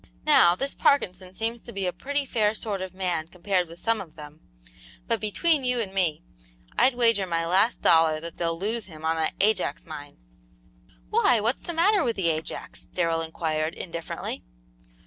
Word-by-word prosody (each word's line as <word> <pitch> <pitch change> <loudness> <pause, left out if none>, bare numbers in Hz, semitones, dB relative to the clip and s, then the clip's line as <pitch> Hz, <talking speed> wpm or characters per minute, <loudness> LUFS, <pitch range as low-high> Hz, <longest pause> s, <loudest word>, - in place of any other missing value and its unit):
Now, 175 0 +6
this 275 +9 -2
Parkinson 185 -9 +1
seems 230 +2 -3
to - - -11
be 195 -1 -3
a 180 - -1
pretty 285 +1 -2
fair 220 -4 +1
sort 205 -4 -3
of 185 -1 -5
man 175 -4 -1
compared 180 +1 -1
with 165 +1 -12
some 225 +3 0
of 170 -5 -12
them, 150 +1 -11 0.7
but - - 0
between 290 - +1
you 250 -1 +1
and 200 -4 -3
me, 170 -4 +1 0.5
I'd 260 -1 +4
wager 230 -5 +3
my 165 -1 0
last 190 +7 +2
dollar 160 -2 +5
that 165 +1 -7
they'll 165 -1 -1
lose 215 +4 -2
him 160 -3 -10
on 160 0 +2
that 160 - 0
Ajax 200 -7 +1
mine!" 145 -2 -9 0.9
"Why, 245 -3 +4
what's 230 +5 0
the 345 - -5
matter 390 +3 +4
with 235 -4 0
the 180 -4 +1
Ajax?" 155 0 -5
Darrell 165 -2 0
inquired, 160 -1 -2
indifferently. 170 -2 -5
185 Hz, 180 wpm, -26 LUFS, 165-230 Hz, 0.9 s, Now